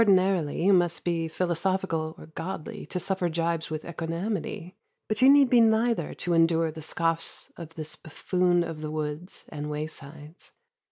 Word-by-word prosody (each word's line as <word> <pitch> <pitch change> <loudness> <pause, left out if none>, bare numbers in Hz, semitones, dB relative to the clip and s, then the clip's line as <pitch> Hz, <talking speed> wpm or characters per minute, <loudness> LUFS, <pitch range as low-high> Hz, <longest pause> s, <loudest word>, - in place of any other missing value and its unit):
Ordinarily 185 -7 +3
you 200 - +6
must 175 -2 +2
be 165 -2 0
philosophical 170 -1 -1
or - - -11
godly 160 0 -6
to 180 - -3
suffer 180 0 -1
gibes 165 0 -1
with 155 0 -4
equanimity, 170 +2 -4 0.3
but 215 +1 -2
you 260 - +8
need 280 -1 +7
be 245 -1 +5
neither 225 -5 +2
to 175 - -1
endure 165 -1 +3
the 160 +1 -9
scoffs 165 +1 -2
of 165 -1 -10
this 155 -1 -5
buffoon 175 +3 +1
of 165 -2 -6
the 155 - -4
woods 155 +3 -4
and 150 -1 -5
waysides. 150 +1 -7
165 Hz, 160 wpm, -27 LUFS, 155-185 Hz, 0.3 s, you